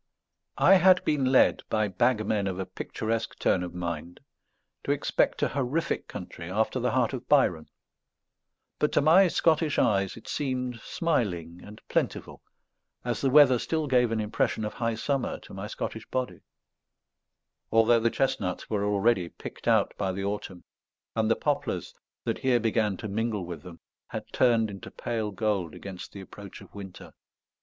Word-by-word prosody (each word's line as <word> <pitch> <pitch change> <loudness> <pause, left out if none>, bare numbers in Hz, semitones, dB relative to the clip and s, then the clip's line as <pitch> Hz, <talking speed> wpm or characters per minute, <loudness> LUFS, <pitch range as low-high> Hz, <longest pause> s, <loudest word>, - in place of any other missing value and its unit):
I - - +6
had 185 +1 +5
been 145 -3 +1
led, 130 0 +4
by 110 -1 +1
bagmen 110 0 +1
of 95 -1 -3
a 95 - -3
picturesque 115 +4 -3
turn - - +2
of 90 -1 -6
mind, 85 -1 -5 0.6
to - - -7
expect - - +1
a - - +2
horrific 140 +5 -1
country 90 -2 -8
after 110 +6 0
the 125 0 +1
heart 125 -2 +1
of 130 - -6
Byron; 95 - +3 1.1
but 150 - +2
to - - +4
my 170 +6 +6
Scottish 160 -3 +2
eyes 100 -1 +2
it 115 - -13
seemed 125 -4 -2
smiling 90 - -1
and 105 +1 -11
plentiful, - - -2 0.6
as 120 -2 -2
the 135 - +2
weather 130 -3 +7
still 160 +3 -1
gave 125 -4 +3
an 115 - 0
impression 110 0 -1
of 105 - -4
high 115 -1 -1
summer 135 +3 -1
to - - -13
my 95 +2 -5
Scottish 110 0 -5
body; 130 -1 -3 1.3
although 115 +1 +5
the 115 +1 +2
chestnuts 105 -9 -1
were 105 -2 0
already 100 -2 +2
picked - - -10
out - - +3
by 95 - 0
the 95 +1 -4
autumn, 100 -3 -4 0.5
and 110 -1 +1
the 115 - +4
poplars, - - -2 0.3
that - - -2
here 130 -2 +3
began 110 -3 +1
to 110 - -5
mingle 105 -2 -2
with 85 -3 -7
them, 90 -2 -11 0.3
had - - -5
turned 115 -4 +3
into 100 - -9
pale 110 -3 -3
gold 100 -4 -1
against 95 -2 -8
the 100 - -9
approach 100 0 -11
of - - -15
winter. 100 -2 -10
110 Hz, 165 wpm, -27 LUFS, 95-125 Hz, 1.3 s, weather